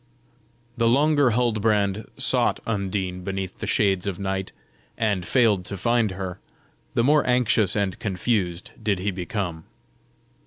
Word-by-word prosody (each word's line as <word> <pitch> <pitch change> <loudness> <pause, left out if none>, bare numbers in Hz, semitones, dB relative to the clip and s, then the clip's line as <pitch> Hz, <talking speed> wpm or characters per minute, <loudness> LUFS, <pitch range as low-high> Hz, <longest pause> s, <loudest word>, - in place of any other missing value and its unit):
The 115 -1 +2
longer 145 +2 +4
Huldbrand 110 -3 +1
sought - - +2
Undine 95 -4 -2
beneath 95 -1 -4
the - - -4
shades 95 -2 +1
of 95 -3 -2
night, 95 -1 -3 0.5
and 105 -5 0
failed 110 -7 +3
to 100 - -5
find 115 +2 +2
her, 95 -1 -5 0.6
the - - +3
more 150 +3 +4
anxious 115 -5 +3
and 100 -3 -1
confused 95 -3 -1
did 105 -3 +1
he 100 +3 -1
become. 90 -3 -4
100 Hz, 130 wpm, -24 LUFS, 95-115 Hz, 0.6 s, longer